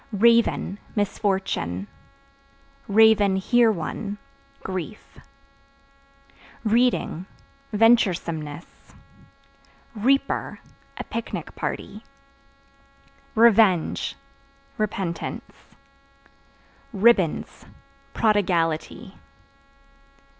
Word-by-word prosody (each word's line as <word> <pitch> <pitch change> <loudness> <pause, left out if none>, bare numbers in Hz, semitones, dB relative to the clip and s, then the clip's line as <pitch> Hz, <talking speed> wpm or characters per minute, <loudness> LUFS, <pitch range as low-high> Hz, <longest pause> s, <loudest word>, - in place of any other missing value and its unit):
Raven 230 -2 +2 0.2
Misfortune; 190 - -1 1.0
(hear 220 +2 +4
one) 200 +3 -5 0.5
grief. 190 +3 -7 1.4
Reading 230 -6 +1 0.4
Venturesomeness. 175 -9 0 1.0
Reaper 270 +6 0 0.4
A - - -4
picnic 230 0 -6
party. 210 +2 -5 1.3
Revenge 220 -6 +3 0.6
Repentance. 195 -5 -5 1.2
Ribbons 200 -6 +1 0.5
Prodigality. 175 -7 0
205 Hz, 45 wpm, -24 LUFS, 180-225 Hz, 1.4 s, hear